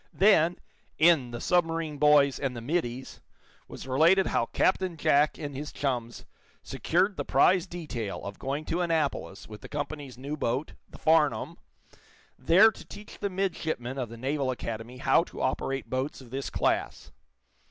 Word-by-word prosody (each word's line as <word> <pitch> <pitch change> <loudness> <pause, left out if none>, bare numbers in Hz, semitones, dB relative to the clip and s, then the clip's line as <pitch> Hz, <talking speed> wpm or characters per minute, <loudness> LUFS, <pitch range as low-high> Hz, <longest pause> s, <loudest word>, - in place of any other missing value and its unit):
Then, 180 -3 +4 0.4
in 155 -5 +4
"The 120 0 -6
Submarine 165 -4 0
Boys 145 -2 +4
and 130 -3 -3
the - - -6
Middies," 130 -2 -3 0.5
was - - -9
related 165 +9 +4
how 115 - 0
Captain 185 -2 0
Jack 145 0 +3
and 145 -3 -6
his 145 +2 -6
chums 125 -4 -3 0.4
secured 185 +4 0
the - - -2
prize 185 0 +3
detail 140 - -5
of 100 0 -7
going 140 +3 -3
to 175 - -1
Annapolis 155 - -2
with 105 -1 -11
the - - -10
company's 145 -3 -5
new 140 +4 -5
boat, 130 +1 -2 0.2
the - - -13
"Farnum," 155 -2 +2 0.8
there 180 +12 +5
to - - -13
teach 210 0 -12
the 200 - -2
midshipmen 160 -9 -3
of 125 -3 -3
the 115 - -10
Naval 135 +2 -1
Academy 115 -1 -5
how 135 +4 +3
to - - -11
operate 135 +1 -2
boats 130 +3 -3
of 125 -3 -14
this 135 +1 -4
class. - - -1
145 Hz, 160 wpm, -28 LUFS, 130-165 Hz, 0.8 s, there